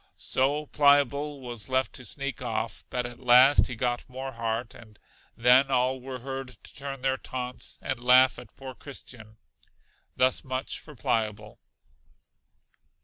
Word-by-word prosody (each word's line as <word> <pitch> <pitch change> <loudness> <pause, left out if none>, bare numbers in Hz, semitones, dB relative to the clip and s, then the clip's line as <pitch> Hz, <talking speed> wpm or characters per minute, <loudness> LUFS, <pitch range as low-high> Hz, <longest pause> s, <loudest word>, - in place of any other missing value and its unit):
So 145 +3 0
Pliable 145 0 +2
was 120 -4 -5
left 130 0 0
to 125 - -9
sneak 140 0 -4
off; 115 -2 -3
but 125 -1 -2
at 120 0 -8
last 125 +3 +6
he 125 - -5
got 120 +1 -2
more 130 +1 -6
heart, 115 0 -3
and 110 -2 -15 0.4
then 125 +3 +5
all 130 0 +1
were 130 -1 -7
heard 135 -1 -6
to - - -12
turn 135 -1 -7
their 130 0 +1
taunts, 125 -1 -5
and 130 - -2
laugh 125 +1 +5
at - - -15
poor 135 -1 -8
Christian. 120 -5 -9 0.8
Thus 130 0 +2
much 130 0 -4
for 150 - -13
Pliable. 105 -2 -2
130 Hz, 145 wpm, -27 LUFS, 120-135 Hz, 0.8 s, last